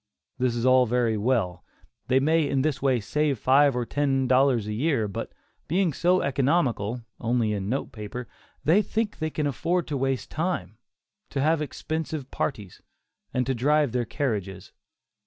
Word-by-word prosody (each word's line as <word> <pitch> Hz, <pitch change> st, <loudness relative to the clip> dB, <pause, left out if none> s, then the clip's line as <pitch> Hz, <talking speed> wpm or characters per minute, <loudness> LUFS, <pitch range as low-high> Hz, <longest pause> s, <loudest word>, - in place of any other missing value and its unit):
This 125 Hz, -2 st, +1 dB
is 120 Hz, +1 st, -1 dB
all 130 Hz, -1 st, +5 dB
very 120 Hz, -1 st, +1 dB
well; 105 Hz, -5 st, 0 dB, 0.4 s
they 130 Hz, +1 st, +4 dB
may 155 Hz, +1 st, +2 dB
in 135 Hz, -1 st, +1 dB
this 155 Hz, -2 st, -1 dB
way 130 Hz, -3 st, +2 dB
save 145 Hz, +5 st, 0 dB
five 135 Hz, +3 st, +4 dB
or 125 Hz, -1 st, -1 dB
ten 135 Hz, -1 st, 0 dB
dollars 130 Hz, -3 st, +3 dB
a 105 Hz, -, -3 dB
year, 125 Hz, -2 st, +1 dB
but 100 Hz, -, -5 dB, 0.4 s
being 175 Hz, 0 st, +1 dB
so 180 Hz, +5 st, +2 dB
economical 130 Hz, -, +1 dB, 0.2 s
(only 115 Hz, -2 st, +1 dB
in 100 Hz, -1 st, -3 dB
note 135 Hz, +4 st, -2 dB
paper), 110 Hz, +3 st, -7 dB, 0.4 s
they 175 Hz, +7 st, +4 dB
think 215 Hz, 0 st, -2 dB
they 155 Hz, -1 st, -1 dB
can 150 Hz, -1 st, -2 dB
afford 170 Hz, +6 st, 0 dB
to 145 Hz, -, -1 dB
waste 135 Hz, -1 st, -2 dB
time; 140 Hz, -, -3 dB, 0.5 s
to 140 Hz, -, -3 dB
have 155 Hz, +3 st, +2 dB
expensive 155 Hz, -1 st, -4 dB
parties, 105 Hz, -9 st, -4 dB, 0.5 s
and 125 Hz, 0 st, 0 dB
to 135 Hz, -, 0 dB
drive 145 Hz, +2 st, +2 dB
their 120 Hz, 0 st, 0 dB
carriages. 100 Hz, -8 st, -3 dB
130 Hz, 165 wpm, -26 LUFS, 115-150 Hz, 0.5 s, all